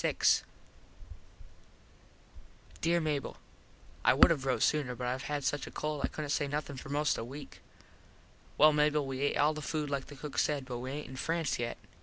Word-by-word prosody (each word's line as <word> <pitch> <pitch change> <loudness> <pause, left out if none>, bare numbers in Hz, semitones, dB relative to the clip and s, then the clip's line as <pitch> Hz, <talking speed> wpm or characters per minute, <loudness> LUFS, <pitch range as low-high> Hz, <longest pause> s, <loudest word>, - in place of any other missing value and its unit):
_ - - +3 2.4
Dere 170 +1 +3
Mable: 150 -4 -2 0.7
I - - +5
would - - +7
have 135 -5 -1
rote 130 - +2
sooner 140 -5 +1
but 125 - -4
I 125 +1 0
had 145 +1 -3
such 145 +1 -1
a - - -6
cold 150 -1 -3
I - - +3
couldnt 150 -2 -5
say 145 - +1
nothin 145 0 -3
for 135 - -9
most 145 +1 +1
a - - -3
weak. 140 +5 -9 1.0
Well 155 0 +7
Mable, 150 -1 +2
we 135 0 -4
et - - -2
all 150 +2 +4
the 155 - -6
food 150 0 -2
like 140 -1 -2
the 145 - -10
cook 145 +1 -4
said 145 -3 +1
but 125 -2 -5
we 130 +1 -5
aint 145 +2 -5
in 130 - -8
France 165 -2 -1
yet. 120 -1 -2
145 Hz, 195 wpm, -32 LUFS, 135-150 Hz, 2.4 s, would